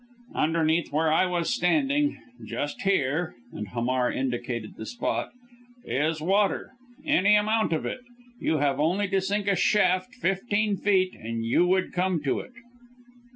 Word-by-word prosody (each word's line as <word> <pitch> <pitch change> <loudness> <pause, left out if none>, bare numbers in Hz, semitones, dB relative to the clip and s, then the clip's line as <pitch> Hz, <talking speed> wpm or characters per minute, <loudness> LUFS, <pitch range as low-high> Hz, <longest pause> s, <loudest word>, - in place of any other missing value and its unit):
"Underneath 160 +1 +1
where 155 +1 +2
I 185 +3 +3
was 175 -2 0
standing 285 - +1 0.2
just 145 - -4
here," 170 -5 0 0.2
and 105 - -5
Hamar 125 +3 0
indicated 120 -3 -3
the 110 - -8
spot 240 - -2 0.6
"is 155 +4 0
water. 195 +5 +1 0.3
Any 210 -9 +4
amount 215 0 +2
of 160 - -1
it, 255 - -4 0.4
you 160 - +1
have 140 -1 +1
only 180 +7 +1
to 195 -1 +1
sink 200 +1 -1
a 200 - +3
shaft 185 +4 +2
fifteen 205 -1 0
feet 190 -2 +2
and 115 0 -5
you 150 +10 +3
would 185 +1 +1
come 180 -1 +1
to 135 - 0
it." 255 - -10
180 Hz, 150 wpm, -26 LUFS, 145-205 Hz, 0.6 s, Any